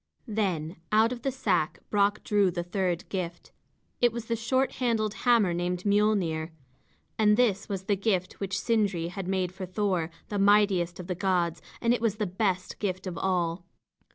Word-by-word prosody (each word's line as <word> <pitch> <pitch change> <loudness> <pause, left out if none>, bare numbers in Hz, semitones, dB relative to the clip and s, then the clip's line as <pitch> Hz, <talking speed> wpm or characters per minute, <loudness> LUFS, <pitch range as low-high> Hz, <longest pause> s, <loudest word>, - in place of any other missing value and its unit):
Then 190 -6 -1
out 220 +2 +4
of 245 -1 -5
the 270 - -1
sack 185 -11 0
Brock 205 0 +2
drew 205 -2 +3
the 175 -1 -3
third 180 -1 -2
gift. 175 -3 -5 0.5
It 240 -1 +5
was 235 0 -5
the 230 - -1
short 260 +4 +1
handled 220 -4 +1
hammer 215 -3 +3
named 175 +1 -2
Miölnir. 200 -6 +2 0.7
And 210 -1 +5
this 220 -6 +2
was 195 -2 -3
the 200 +1 +1
gift 190 -2 -1
which 195 0 -2
Sindri 200 -7 +1
had 185 0 -6
made 185 -2 0
for 185 0 -7
Thor, 185 -4 0 0.2
the 205 - -2
mightiest 195 -4 +3
of 180 - -6
the 180 - -2
gods; 175 -3 0 0.2
and 235 0 +3
it 245 - -1
was 225 -3 +1
the 210 0 -1
best 185 -1 -1
gift 185 -2 -2
of 185 -2 -4
all. 175 -2 -1
195 Hz, 180 wpm, -28 LUFS, 180-215 Hz, 0.7 s, It